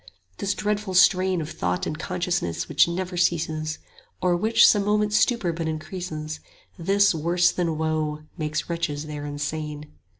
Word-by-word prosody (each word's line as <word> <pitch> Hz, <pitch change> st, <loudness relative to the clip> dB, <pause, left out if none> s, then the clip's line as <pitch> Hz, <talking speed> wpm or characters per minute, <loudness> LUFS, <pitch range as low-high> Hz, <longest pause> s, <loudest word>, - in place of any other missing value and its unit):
This 200 Hz, 0 st, -1 dB
dreadful 210 Hz, -2 st, -2 dB
strain 185 Hz, -1 st, +4 dB
Of 155 Hz, +1 st, -5 dB
thought 90 Hz, 0 st, -2 dB
and -, -, -3 dB
consciousness 170 Hz, -, -2 dB
which -, -, +4 dB
never 180 Hz, +1 st, -3 dB
ceases, 155 Hz, -3 st, 0 dB
75 -, -, -12 dB, 0.4 s
Or 180 Hz, -1 st, +3 dB
which 220 Hz, +6 st, +5 dB
some 205 Hz, -2 st, +4 dB
moments' 210 Hz, +1 st, +2 dB
stupor 220 Hz, -9 st, +1 dB
but 165 Hz, 0 st, -3 dB
increases, 155 Hz, -1 st, -5 dB, 0.4 s
This, 195 Hz, +3 st, +3 dB
worse 170 Hz, +2 st, +2 dB
than 165 Hz, -3 st, -1 dB
woe, 155 Hz, -1 st, -1 dB
makes 155 Hz, -2 st, -3 dB
wretches 160 Hz, -3 st, -2 dB
there 150 Hz, -1 st, -6 dB
insane. 150 Hz, +1 st, -5 dB
170 Hz, 155 wpm, -24 LUFS, 155-185 Hz, 0.4 s, which